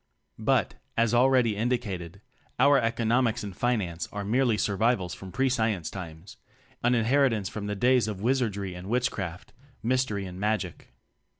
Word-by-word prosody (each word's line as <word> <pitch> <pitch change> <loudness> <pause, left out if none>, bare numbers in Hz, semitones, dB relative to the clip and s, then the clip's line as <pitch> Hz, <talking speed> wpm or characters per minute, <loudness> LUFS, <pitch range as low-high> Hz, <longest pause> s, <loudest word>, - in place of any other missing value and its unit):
But, - - +1 0.2
as 115 0 +2
already 125 -3 +4
indicated, 100 -6 -2 0.4
our 140 +2 +5
"eco 115 0 -1
nomics 115 0 +2
and 100 -3 -6
finance" 95 -9 -1
are 105 0 -4
merely 120 +1 +2
sur 100 0 0
vivals 105 -5 +1
from 95 -1 -9
pre 135 +5 +1
science 110 -9 0
times; 85 -1 -9 0.4
an 120 +1 +3
in 115 -2 +1
heritance 120 -6 +2
from 105 -1 -5
the 105 - -2
days 125 +1 +3
of 105 -3 -4
wizardry 105 -5 0
and 90 +2 -8
witchcraft, 105 -7 -2 0.3
mystery 120 -5 0
and 90 0 -8
magic. 105 -4 -2
110 Hz, 160 wpm, -27 LUFS, 95-125 Hz, 0.4 s, our